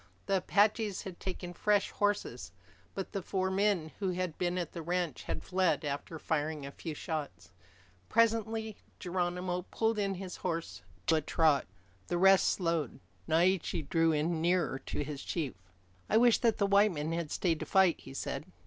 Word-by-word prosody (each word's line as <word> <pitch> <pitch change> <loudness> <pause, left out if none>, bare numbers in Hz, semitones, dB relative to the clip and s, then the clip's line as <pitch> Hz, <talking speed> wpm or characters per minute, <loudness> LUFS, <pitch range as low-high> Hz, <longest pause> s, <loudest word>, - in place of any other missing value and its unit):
The 195 -1 +2
Apaches 205 +2 +2
had 185 -3 -8
taken 180 -1 -5
fresh 205 +2 +2
horses. 160 - -1 0.4
But 195 - -4
the 195 - -3
four 190 +1 -1
men 190 -5 +1
who 195 -2 0
had 180 -3 -2
been 180 0 0
at 175 -3 -2
the 170 - -6
ranch 175 -2 -2
had - - -4
fled 185 -4 +1
after 145 +3 -4
firing 155 -1 -2
a 140 - -6
few 160 +1 -6
shots. 140 - -5 0.6
Presently 225 -1 +1 0.2
Geronimo 180 0 -1
pulled 225 -1 0
in 195 -1 0
his 185 0 -6
horse 165 - -3 0.2
to 160 - +4
a - - 0
trot. 155 -1 +2 0.4
The 175 - 0
rest 195 +1 +6
slowed. 165 - -1 0.3
Naiche 170 -2 +2
drew 165 +1 +3
in 160 +2 0
nearer 175 -5 +1
to - - -2
his 145 -1 -6
chief. 155 -7 -2 0.6
"I 220 - +4
wish 240 0 +5
that 230 -2 +2
the 200 - +2
white 200 +1 +5
men 150 +1 -3
had 165 -2 -2
stayed 165 -1 0
to - - -5
fight," 190 -3 +4
he 135 - -11
said. 150 - -4
175 Hz, 175 wpm, -32 LUFS, 160-195 Hz, 0.6 s, rest